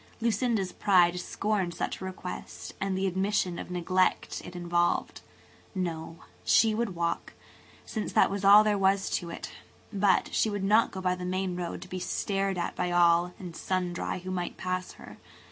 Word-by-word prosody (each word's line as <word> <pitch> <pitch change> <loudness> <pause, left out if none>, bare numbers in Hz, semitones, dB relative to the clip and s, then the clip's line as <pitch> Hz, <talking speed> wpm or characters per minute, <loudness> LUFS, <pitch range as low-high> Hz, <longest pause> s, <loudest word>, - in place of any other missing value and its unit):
Lucinda's 225 -4 0
pride 180 -3 +3
scorned 190 -2 -1
such - - -3
a - - -4
request 185 -1 -7
and 195 -1 -1
the 190 - 0
admission 190 -1 0
of - - -7
neglect 180 +1 0
it 180 - -10
involved. 175 0 0 0.5
No, 165 -3 -4 0.2
she 220 -1 +4
would 215 -4 -2
walk, 170 0 -2 0.5
since 215 -2 -4
that - - +4
was 200 0 -3
all 205 +2 +9
there 210 -1 +1
was 195 0 +2
to 170 - -2
it; - - -7 0.4
but 200 -1 +2
she 220 - +2
would 205 -2 -3
not 215 +4 +4
go 190 - -6
by 180 -1 +1
the 180 0 -6
main 185 0 -1
road 175 0 -4
to - - -12
be 185 0 -5
stared 195 +1 -1
at 170 - -2
by 180 0 -1
all 175 0 +4
and 175 -3 -8
sundry 180 -1 -2
who 185 +1 -6
might 180 -1 -3
pass 185 0 -3
her. - - -13
185 Hz, 180 wpm, -28 LUFS, 175-195 Hz, 0.5 s, all